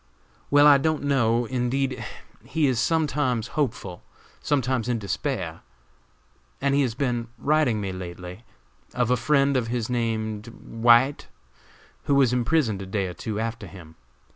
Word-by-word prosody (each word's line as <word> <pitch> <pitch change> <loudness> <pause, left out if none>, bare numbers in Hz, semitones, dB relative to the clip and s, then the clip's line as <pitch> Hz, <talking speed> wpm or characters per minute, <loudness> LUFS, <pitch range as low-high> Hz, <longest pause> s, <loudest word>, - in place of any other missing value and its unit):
"Well, 145 +1 +6
I 145 -2 +7
don't 155 +1 0
know, 120 -4 +2
indeed; 130 +2 -1 0.4
he 160 -2 0
is 130 -4 +1
sometimes 140 -7 0
hopeful, 115 - -3 0.4
sometimes 130 -4 0
in 120 - +1
despair; 100 -3 -3 1.0
he 140 +1 +2
has 125 -5 -1
been 120 -3 -1
writing 145 -7 +1
me 100 -2 -3
lately 90 +2 -8 0.5
of 125 -1 +1
a - - +5
friend 140 +2 +2
of 125 -3 0
his 120 0 -2
named 110 -2 -2
White, 120 +3 +2 0.8
who 140 - +2
was 130 -3 +4
imprisoned 120 -5 +1
a 95 - -7
day 100 0 -1
or 90 - -5
two 110 +3 -5
after 115 +1 -4
him. 80 -5 -13
120 Hz, 140 wpm, -25 LUFS, 110-140 Hz, 1.0 s, I